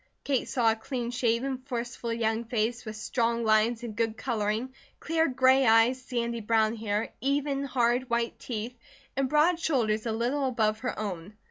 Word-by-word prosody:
Kate 270 -3 0
saw 235 -3 +3
a - - 0
clean 240 +1 -4
shaven, 245 +2 0
forceful 245 -2 -4
young 225 0 0
face, 235 +1 -1
with 215 0 -6
strong 235 +1 0
lines 220 +2 +2
and 225 -3 -6
good 225 0 -1
colouring, 225 +1 -2 0.3
clear 325 +1 +1
gray 260 +1 +4
eyes, 230 +2 +4
sandy 235 -2 -3
brown 220 0 +2
hair, 215 -1 -2
even, 280 0 0
hard, 245 -1 +1
white 235 0 -1
teeth, 235 +1 -5 0.4
and 270 0 0
broad 315 +4 +3
shoulders 235 -9 0
a - - 0
little 250 +5 0
above 220 -4 +1
her 250 - -3
own. 200 -1 -5
235 Hz, 165 wpm, -28 LUFS, 220-260 Hz, 0.4 s, gray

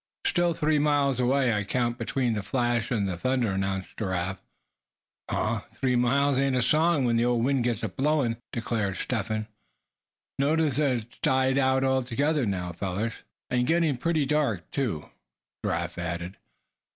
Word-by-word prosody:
"Still 175 -1 +2
three 155 0 +2
miles 145 -3 +2
away; 130 -1 +2
I 105 -1 0
counted 120 +3 -1
between 125 -4 0
the 105 - -2
flash 120 0 0
and 105 -5 0
the 95 - -2
thunder," 130 +1 +1
announced 95 0 -2
Giraffe. 95 -2 -2 0.9
"Huh! - - 0 0.2
three 130 -1 +1
miles 135 +3 +2
ain't 135 -1 +2
a 125 - +2
song 155 +1 +3
when 115 -1 +2
the 115 - +2
old 120 -1 +2
wind 135 -2 +2
gets 120 -2 -1
to 110 - -1
blowing," 130 +2 0
declared 110 -5 -2
Step 110 -3 -2
Hen. 110 -1 -2 0.9
"Notice 150 -1 +2
that 145 -3 +3
it's 120 - -22
died 130 +1 +2
out 130 0 +3
altogether 130 +1 +1
now, 90 -3 -2
fellers?" 100 +6 -3 0.4
"And 125 -1 +1
getting 165 -4 +2
pretty 155 +3 0
dark, 135 - 0
too," 110 - -2 0.6
Giraffe - - -2
added. 85 +2 -4
125 Hz, 160 wpm, -27 LUFS, 110-140 Hz, 0.9 s, song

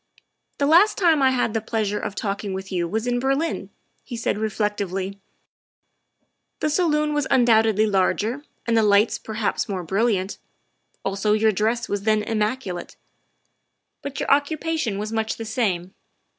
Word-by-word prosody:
' - - -52
' - - -49
The 285 - +1
last 360 +8 +5
time 330 -6 +4
I 265 - +5
had 245 -4 0
the 225 - 0
pleasure 215 -2 -1
of 205 -2 -5
talking 200 -1 -3
with 190 +1 -6
you 175 -2 0
was 220 +6 -2
in 245 0 0
Berlin, 275 +6 -1
' - - -46
' - - -44
he 240 - -7
said 225 -2 -1
reflectively; 200 -3 -2 0.6
' - - -51
' - - -51
the 305 - 0
salon 300 -2 +1
was 295 -2 0
un 245 - +4
doubtedly 220 -2 +4
larger 215 +6 0 0.2
and 230 - +1
the 225 - +5
lights 210 +1 +3
perhaps 220 -1 -2
more 190 -3 -3
brilliant, 195 +1 0 0.7
also 200 +2 +1
your 215 +1 +3
dress 220 +4 0
was 205 -1 -2
then 215 0 +2
immaculate. 215 -3 -2 1.1
But 280 -1 -6
your - - -2
occu 285 +2 +3
pation 310 -10 -2
was 210 +1 -4
much 220 0 -1
the 225 - -6
same. 195 -5 -1
220 Hz, 180 wpm, -23 LUFS, 200-260 Hz, 1.1 s, last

